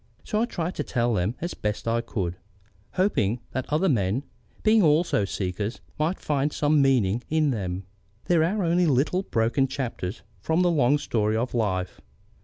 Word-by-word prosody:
So 215 - -1
I - - +3
tried 175 -6 -3
to 150 - -1
tell 120 -3 0
them, 100 +4 0
as 175 +2 -3
best 105 +2 -3
as - - +2
I 115 - +1
could, 95 -7 -3 0.6
hoping 125 - +1
that 130 +2 -4
other 160 +6 +2
men, 115 - +1 0.4
being 220 0 +5
also 155 - +3
seekers, 100 +4 -3 0.2
might 160 +5 0
find 145 0 0
some 150 0 +2
meaning 120 -5 +2
in 155 -2 +2
them. 95 -5 -3 0.4
There 170 -3 +3
are 195 +5 0
only 175 +1 +3
little, 145 +6 +2
broken 120 -3 +1
chapters 120 -7 -4 0.2
from 160 - +1
the 175 - +3
long 145 -3 +3
story 110 -6 0
of 120 +3 -2
life. 95 -6 -1
130 Hz, 175 wpm, -26 LUFS, 105-160 Hz, 0.6 s, being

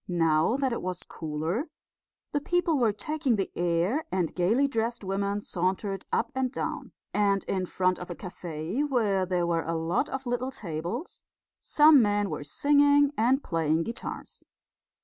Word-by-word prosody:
Now 165 +4 +2
that 265 -3 0
it - - -3
was 180 -1 -4
cooler 165 - -3 0.6
the 290 - 0
people 340 -1 +1
were 230 -3 +3
taking 285 +3 -1
the 195 -2 -2
air, 175 - +1
and 180 -4 0
gaily 220 +11 +2
dressed 230 -3 -2
women 200 +1 -1
sauntered 190 +1 -2
up - - 0
and 260 -1 -1
down; - - -4 0.2
and 200 -1 +2
in 185 -1 -2
front 185 0 0
of 180 - -8
a 175 - -5
cafe, 175 - -5
where 210 -10 +1
there 180 -1 +1
were 170 -1 +1
a 165 - -2
lot 170 - 0
of 265 0 -4
little 245 +1 -1
tables, 185 - -5 0.4
some 300 -2 +6
men 205 -2 +1
were - - -4
singing 285 - +4
and 255 +5 +2
playing 160 -1 +1
guitars. 230 +6 -7
200 Hz, 160 wpm, -28 LUFS, 175-265 Hz, 0.6 s, some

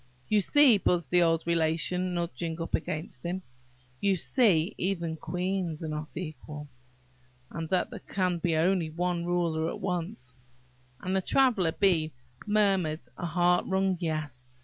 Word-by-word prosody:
"You 210 -1 +4
see," 270 -2 +5
buzzed 175 -7 0
the 180 - +5
old 165 -1 +2
Relation, 170 +2 +1
nudging 170 -1 -3
up 165 - -5
against 155 -5 -3
him,–"You 125 0 -4
see 190 -2 +2
even 170 -3 -1
queens 180 -1 -3
are - - -3
not 150 0 -5
equal! 150 -3 -7 0.8
and 165 -1 -5
that 185 -1 +1
there - - -7
can 180 -3 -1
be 165 -1 +1
but 165 -1 +1
one 175 0 -1
ruler 165 -2 0
at - - -6
once!" 175 - -4 0.7
And 185 +1 -2
the 190 - +2
Traveller 210 -8 +3
bee 165 -6 +2 0.3
murmured 195 -7 +2
a 175 - -4
heart 175 +1 +2
wrung 190 0 +1
"Yes." 155 -7 -4
170 Hz, 145 wpm, -29 LUFS, 160-185 Hz, 0.8 s, see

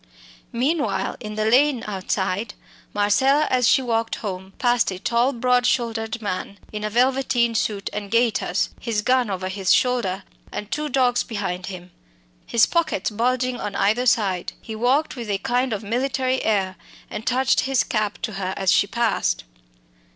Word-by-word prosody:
Meanwhile, 235 - 0
in 210 -2 -7
the 215 0 0
lane 255 +2 +3
outside, 195 +1 -2 0.4
Marcella, 265 +9 +3
as 250 -2 +3
she 265 - +4
walked 230 -2 0
home, 190 -2 -6
passed 240 -2 +2
a 185 - -5
tall 235 +7 +1
broad 250 0 +2
shouldered 230 -2 -1
man 200 0 -4 0.2
in 210 0 -4
a 215 - -1
velveteen 245 0 +2
suit 210 -3 -1
and 205 -1 -5
gaiters, 225 -5 +1
his 220 -3 -2
gun 255 -2 +2
over 185 -1 -3
his 190 -1 0
shoulder 230 -7 +2 0.3
and 210 - -6
two 300 +2 -2
dogs 250 -2 +2
behind 195 -5 -4
him, 180 -2 -8 0.6
his 230 -2 +4
pockets 315 - 0
bulging 250 +3 0
on 205 -1 -4
either 220 +6 +2
side. 195 -6 +1
He 220 - -8
walked 260 +8 +1
with 235 -4 -6
a 200 - +1
kind 245 +5 0
of 215 0 -3
military 255 +3 0
air, 195 -3 0 0.3
and 210 - -6
touched 255 +1 +3
his 270 -1 +2
cap 215 -2 -1
to 220 - -2
her 185 0 -2
as 190 -2 +3
he 200 - +3
passed. 235 +2 0
225 Hz, 165 wpm, -23 LUFS, 200-250 Hz, 0.6 s, she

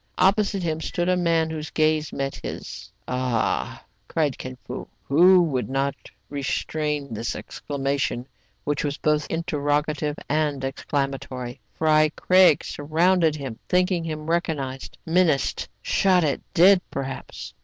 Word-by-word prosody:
Opposite 195 0 +2
him 160 -1 -1
stood 175 +2 -1
a 185 - +4
man 165 -2 +1
whose 155 -1 -5
gaze 155 -1 +1
met 135 0 -3
his. - - -7
" - - -42
Ah! 125 -3 -1
" - - -43
cried 150 -4 0
Kin 130 0 -7
Fo, 125 - -6 0.2
who 175 +3 +5
could 125 -1 -1
not 135 +1 0 0.3
restrain 145 0 -2
this 115 +2 -3
exclamation, 140 -3 -3 0.4
which 145 -1 -1
was 145 0 -2
both 150 -1 +1
interrogative 150 -2 -1
and 145 -2 0
exclamatory. 135 -2 -3 0.2
Fry 155 -1 +4
Craig 185 -4 +5
surrounded 160 +2 +2
him, 135 -6 -6
thinking 180 -1 +2
him 155 -2 -5
recog 165 0 0
nized, 135 -1 -5 0.2
menaced, 165 -4 +1
shot 185 -3 +3
at, 145 -4 0 0.2
dead 185 +2 +7
perhaps. 135 -1 -6
150 Hz, 135 wpm, -24 LUFS, 140-165 Hz, 0.4 s, dead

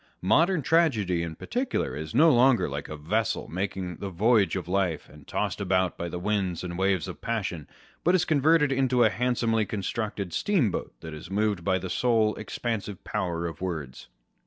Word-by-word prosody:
Modern 165 - +3
tragedy, 115 - +2
in 85 -1 -4
particular, 250 - -2
is 75 +1 -6
no 160 +2 +7
longer 125 0 +4
like 70 0 -5
a 75 - -6
vessel 105 +9 -1
making 90 -1 -4
the 100 - -5
voyage 105 +3 +3
of 90 -3 -4
life, 90 -4 0
and 75 -2 -16
tossed - - -2
about 95 -2 +1
by 85 - -4
the 90 - -5
winds 95 -2 -1
and 85 -1 -5
waves 95 -3 +1
of - - -8
passion, 100 -9 -3 0.4
but 175 +2 +4
is 180 -1 +2
converted 155 -1 +3
into 130 -2 +3
a 110 - +4
handsomely 115 0 +1
constructed 100 -2 -3
steamboat 150 - 0
that 80 - -7
is 75 +3 -9
moved 100 -2 0
by 95 0 +2
the 95 - -5
sole 110 0 +2
expansive 105 -3 -4
power 85 -2 -2
of 80 -2 -6
words. 80 -8 -5
100 Hz, 180 wpm, -27 LUFS, 90-120 Hz, 0.4 s, no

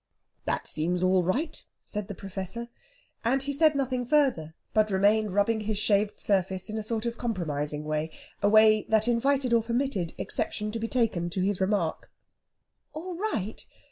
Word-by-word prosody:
"That - - -1
seems 175 +3 -1
all 185 0 +4
right," 260 - -1 0.2
said 210 -2 -5
the 205 - -6
Professor. 195 +5 -6 0.5
And 260 +4 +2
he 285 +1 -2
said 305 +1 +4
nothing 260 -2 0
further, 245 - +1 0.2
but 215 0 +3
remained 205 +2 +3
rubbing 205 +3 +2
his 215 0 -2
shaved 205 0 +2
surface 190 0 0
in 220 - -3
a - - -2
sort 220 +1 -2
of 235 0 -3
compromising 150 -10 -2
way 155 +1 -1 0.3
a 205 - +4
way 215 0 +6
that 220 +1 +3
invited 255 +1 +2
or 230 - +5
permitted 235 -6 -1
exception 210 0 -3
to 230 - -3
be 230 - -2
taken 220 -9 0
to 185 +2 -2
his 195 0 0
remark. 190 -4 0 0.8
"All 355 +4 -5
right? 335 - -3
215 Hz, 170 wpm, -28 LUFS, 190-240 Hz, 0.8 s, way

